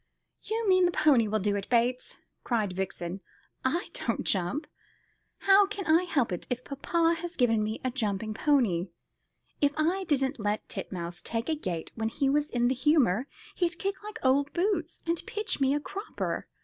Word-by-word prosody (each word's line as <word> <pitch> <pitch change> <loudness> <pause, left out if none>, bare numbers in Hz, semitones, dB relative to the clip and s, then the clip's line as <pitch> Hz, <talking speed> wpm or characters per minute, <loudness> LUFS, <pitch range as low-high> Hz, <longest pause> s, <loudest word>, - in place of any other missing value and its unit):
"You 445 0 -2
mean 370 -1 +5
the - - 0
pony 275 -9 +4
will 215 +1 +1
do 205 0 0
it, 200 -1 -4
Bates," 245 +1 +1 0.3
cried 215 -6 0
Vixen. 185 0 -4 0.4
"I 335 +9 0
don't - - -1
jump. 190 - 0 0.8
How 395 0 +6
can 405 -2 -5
I 330 +3 +4
help 275 - +1
it 175 - -3
if 250 0 -2
papa 330 +4 +1
has 345 +1 -5
given 225 -4 +3
me 215 +1 -3
a 255 - +1
jumping 215 -3 -2
pony? 215 - +2 0.7
If 285 0 +3
I 355 +5 +1
didn't 275 -4 0
let 210 0 -1
Titmouse 175 -1 -5
take 230 +5 -3
a 315 - +2
gate 175 - -4
when 225 -1 -2
he 270 +3 +1
was 295 +1 +1
in 240 0 +1
the 255 - +2
humour, 265 - +3 0.3
he'd 350 -2 -1
kick 390 0 -3
like 425 +1 -7
old 280 +2 +3
boots, 345 -3 -1
and 335 0 0
pitch 425 -8 -1
me 270 0 +4
a - - +1
cropper. 400 +8 -4
270 Hz, 180 wpm, -29 LUFS, 215-340 Hz, 0.8 s, How